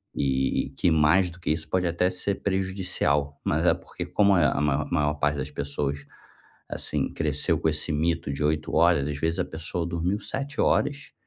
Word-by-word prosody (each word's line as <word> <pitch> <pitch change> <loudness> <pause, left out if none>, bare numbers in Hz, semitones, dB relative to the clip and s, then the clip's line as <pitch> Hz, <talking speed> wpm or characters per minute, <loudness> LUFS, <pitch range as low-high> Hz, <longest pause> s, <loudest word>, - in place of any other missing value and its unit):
e 65 -1 0
que 90 - +2
mais 80 +4 +4
do 85 - -15
que 85 - -4
isso 80 0 -2
pode 90 -1 +1
até 85 +2 +1
ser 95 +2 -2
prejudicial. 95 -7 0
Mas - - 0
é - - +6
porque - - -7
como 100 -2 +3
é 80 - +4
a - - +3
a 70 - -1
ma 75 0 +1
maior 75 0 +1
parte 75 0 0
das 70 +1 -3
pessoas, 70 0 -3 0.7
assim, - - -2
cresceu 75 -3 0
com 80 - +1
esse 80 +1 0
mito 80 -1 0
de 70 - -3
8 75 +1 0
horas, 80 -3 +4
às 75 -1 -4
vezes, 80 +4 -1
a - - +1
pessoa 80 +2 -3
dormiu 85 +4 -1
7 140 +1 -4
horas 145 0 +1
80 Hz, 195 wpm, -26 LUFS, 75-90 Hz, 0.7 s, é